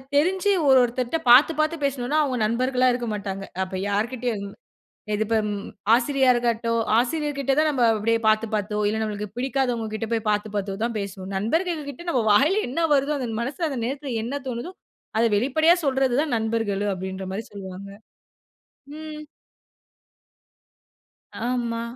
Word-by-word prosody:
தெரிஞ்சு 370 Hz, +7 st, +2 dB, 0.2 s
ஒரு 265 Hz, -, +7 dB
ஒருத்தர்ட்ட 245 Hz, +5 st, -1 dB
பாத்து, 260 Hz, +7 st, +8 dB
பாத்து 310 Hz, +2 st, +2 dB
பேசுனோம்னா, 275 Hz, +1 st, 0 dB
அவங்க 260 Hz, -3 st, -1 dB
நண்பர்களா 255 Hz, +3 st, +1 dB
இருக்க 240 Hz, -1 st, -3 dB
மாட்டாங்க. 195 Hz, -1 st, -4 dB, 0.2 s
அப்ப 190 Hz, 0 st, -6 dB
யார்கிட்டயும். 220 Hz, 0 st, -2 dB, 0.7 s
இதுபோ 220 Hz, +1 st, 0 dB
ம் 205 Hz, 0 st, -4 dB, 0.3 s
ஆசிரியாருக்கட்டும், 240 Hz, -3 st, +2 dB, 0.2 s
ஆசிரியர்கிட்ட 280 Hz, 0 st, -1 dB
தான் 310 Hz, 0 st, +3 dB
நம்ம 260 Hz, -4 st, +1 dB
அப்டியே 230 Hz, +2 st, +1 dB
பாத்து, 215 Hz, +1 st, +3 dB
பாத்தோ 210 Hz, 0 st, -2 dB
இல்ல, 220 Hz, +1 st, -1 dB
நமக்கு 210 Hz, 0 st, -4 dB
பிடிக்காதவங்ககிட்ட 240 Hz, -4 st, -1 dB
போய் 225 Hz, -1 st, -1 dB
பாத்து, 210 Hz, +1 st, -1 dB
பாத்தோ 195 Hz, -1 st, -3 dB
தான் 235 Hz, -1 st, -3 dB
பேசுவோம். 195 Hz, -1 st, -6 dB
நண்பர்கள்கிட்ட 310 Hz, -, -2 dB
நம்ம 245 Hz, -4 st, +1 dB
வாயில 290 Hz, -, +4 dB
என்ன 325 Hz, +5 st, 0 dB
வருதோ, 280 Hz, +2 st, +1 dB
அந்த 245 Hz, -3 st, -3 dB
மனசுல 290 Hz, +7 st, -2 dB
அந்த 260 Hz, -, -3 dB
நேரத்துல 275 Hz, +1 st, -4 dB
என்ன 280 Hz, +4 st, -4 dB
தோனுதோ, 255 Hz, +9 st, -5 dB, 0.5 s
அத 230 Hz, -, +4 dB
வெளிப்படையா 315 Hz, +8 st, +4 dB
சொல்றது 265 Hz, -2 st, +2 dB
தான் 290 Hz, -6 st, -1 dB
நண்பர்கள். 220 Hz, -3 st, -1 dB
அப்டின்ற 190 Hz, +1 st, -5 dB
மாரி 215 Hz, +4 st, -3 dB
சொல்வாங்க. 195 Hz, -1 st, -8 dB, 1.1 s
ம். 305 Hz, -1 st, -7 dB, 2.3 s
ஆமா, 235 Hz, -2 st, -1 dB
240 Hz, 135 wpm, -24 LUFS, 215-275 Hz, 2.3 s, பாத்து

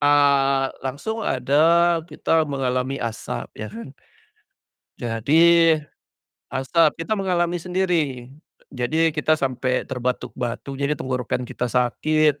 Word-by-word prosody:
ah, 140 Hz, -2 st, +3 dB
langsung 185 Hz, -, -4 dB
ada 165 Hz, +6 st, +3 dB
kita 160 Hz, -1 st, +1 dB
mengalami 130 Hz, -1 st, -1 dB
asap, 115 Hz, -1 st, -4 dB
ya 105 Hz, 0 st, -5 dB
kan. 115 Hz, +5 st, -9 dB, 1.1 s
Jadi, 160 Hz, +8 st, +4 dB, 0.8 s
asap, 150 Hz, +5 st, +1 dB
kita 215 Hz, -, 0 dB
mengalami 175 Hz, -3 st, 0 dB
sendiri. 170 Hz, -9 st, -1 dB, 0.5 s
Jadi, 155 Hz, +6 st, +1 dB
kita 155 Hz, 0 st, +2 dB
sampai 130 Hz, -2 st, -1 dB
terbatuk-batuk 125 Hz, 0 st, -4 dB
jadi 145 Hz, +1 st, 0 dB
tenggorokan 125 Hz, -1 st, -2 dB
kita 125 Hz, +1 st, -3 dB
sakit, 150 Hz, +4 st, +1 dB
140 Hz, 100 wpm, -22 LUFS, 125-165 Hz, 1.1 s, Jadi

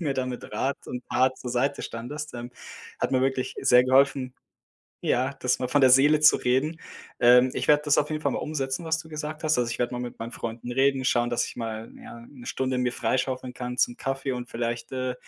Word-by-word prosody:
mir 145 Hz, -5 st, -1 dB
da 130 Hz, -, -1 dB
mit 125 Hz, -1 st, -6 dB
Rat 135 Hz, +1 st, -1 dB
und 125 Hz, -, -5 dB
Tat 130 Hz, 0 st, +2 dB
zur 125 Hz, -, -6 dB
Seite 130 Hz, +4 st, 0 dB
standest. 145 Hz, +7 st, -6 dB
Ähm, 120 Hz, 0 st, -7 dB, 0.5 s
hat -, -, -1 dB
mir 130 Hz, -, +3 dB
wirklich 130 Hz, -1 st, -1 dB
sehr 125 Hz, 0 st, +6 dB
geholfen, 130 Hz, 0 st, +3 dB, 0.7 s
ja, 130 Hz, +3 st, +1 dB
das 125 Hz, 0 st, +1 dB
mal 125 Hz, -, -1 dB
von 145 Hz, +2 st, +2 dB
der 130 Hz, -, +7 dB
Seele 145 Hz, +4 st, +6 dB
zu 150 Hz, -, +7 dB
reden. 140 Hz, +6 st, 0 dB, 0.4 s
Ähm, 125 Hz, +1 st, +6 dB
ich -, -, -3 dB
werde 150 Hz, 0 st, +5 dB
das 145 Hz, -, +3 dB
auf 150 Hz, -, -1 dB
jeden 155 Hz, -1 st, -3 dB
Fall -, -, +1 dB
mal -, -, -2 dB
umsetzen, 145 Hz, +1 st, -3 dB
was 160 Hz, 0 st, +1 dB
du 160 Hz, 0 st, -9 dB
gesagt 155 Hz, 0 st, -6 dB
hast. 155 Hz, 0 st, +2 dB
Also, 120 Hz, -1 st, 0 dB
ich 120 Hz, -, -4 dB
werde 120 Hz, 0 st, -1 dB
mal 120 Hz, -, -3 dB
mit 125 Hz, -1 st, -6 dB
meinen 115 Hz, +1 st, -6 dB
Freunden 115 Hz, +1 st, -6 dB
reden, 135 Hz, +1 st, +2 dB
schauen, 120 Hz, -1 st, +2 dB
dass 120 Hz, 0 st, 0 dB
ich -, -, -9 dB
mal, 115 Hz, -1 st, -5 dB
ja, 115 Hz, -, -11 dB
'ne 125 Hz, -4 st, -14 dB
Stunde 130 Hz, -1 st, -1 dB
mir 125 Hz, -1 st, 0 dB
freischaufeln 130 Hz, 0 st, -1 dB
kann 125 Hz, 0 st, -5 dB
zum 120 Hz, -, +2 dB
Kaffee 135 Hz, 0 st, -3 dB
und 125 Hz, -1 st, -5 dB
vielleicht, 120 Hz, 0 st, -3 dB
äh, 130 Hz, -1 st, -2 dB
130 Hz, 230 wpm, -26 LUFS, 125-140 Hz, 0.7 s, der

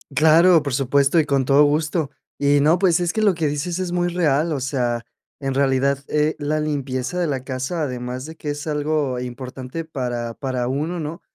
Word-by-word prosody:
Claro, 160 Hz, +2 st, +6 dB
por 140 Hz, -3 st, -3 dB
supuesto, 140 Hz, +4 st, +3 dB
y 155 Hz, -, +2 dB
con 140 Hz, -3 st, +1 dB
todo 140 Hz, +3 st, +5 dB
gusto. 155 Hz, 0 st, 0 dB, 0.3 s
Y 145 Hz, 0 st, +3 dB
no, 160 Hz, +4 st, +4 dB
pues, 180 Hz, -3 st, +3 dB
es 175 Hz, -1 st, 0 dB
que 220 Hz, -, -1 dB
lo 205 Hz, -3 st, +4 dB
que 160 Hz, -2 st, -1 dB
dices, 160 Hz, +5 st, -2 dB
es 180 Hz, -2 st, -2 dB
muy 175 Hz, 0 st, +1 dB
real. 160 Hz, -2 st, +1 dB
O 135 Hz, -, -3 dB
sea, 120 Hz, -3 st, -1 dB, 0.4 s
en 135 Hz, -1 st, -1 dB
realidad, 135 Hz, 0 st, +2 dB
eh, 150 Hz, +1 st, +1 dB
la 150 Hz, +1 st, -1 dB
limpieza 140 Hz, +2 st, -2 dB
de 175 Hz, -, +1 dB
la 135 Hz, -3 st, -2 dB
casa, 135 Hz, +5 st, -3 dB
además 125 Hz, 0 st, -4 dB
de 160 Hz, +1 st, -9 dB
que 150 Hz, -, -4 dB
es 145 Hz, +2 st, -6 dB
algo 150 Hz, -3 st, -1 dB
importante 130 Hz, +4 st, -6 dB
para 120 Hz, -6 st, -4 dB
para 130 Hz, -2 st, -3 dB
uno, 155 Hz, +6 st, -2 dB
¿no? 155 Hz, +3 st, -6 dB
145 Hz, 200 wpm, -21 LUFS, 130-160 Hz, 0.4 s, Claro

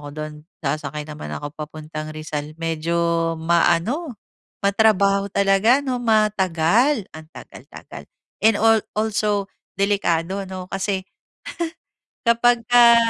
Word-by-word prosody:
ako 145 Hz, -, -10 dB
do'n. 155 Hz, 0 st, -6 dB, 0.3 s
Sasakay 150 Hz, +1 st, -3 dB
naman 150 Hz, 0 st, -7 dB
ako 145 Hz, 0 st, -6 dB
papuntang 155 Hz, 0 st, -7 dB
Rizal. 155 Hz, -1 st, -5 dB
Medyo 165 Hz, +1 st, 0 dB
ma-ano, 175 Hz, -, +1 dB, 0.5 s
matrabaho 200 Hz, -1 st, +3 dB
talaga, 200 Hz, +7 st, +4 dB
'no, 255 Hz, -2 st, -1 dB
Matagal! 215 Hz, -, +2 dB
Ang 155 Hz, -, -11 dB
tagal -, -, -12 dB
tagal! -, -, -10 dB, 0.4 s
And 220 Hz, -1 st, +5 dB
al 225 Hz, -1 st, +4 dB
also 210 Hz, -2 st, 0 dB, 0.3 s
delikado, 195 Hz, -2 st, 0 dB
ano. 185 Hz, -1 st, -7 dB
Kasi 195 Hz, 0 st, -1 dB, 1.3 s
kapagka 235 Hz, 0 st, +5 dB
195 Hz, 105 wpm, -22 LUFS, 160-220 Hz, 1.3 s, And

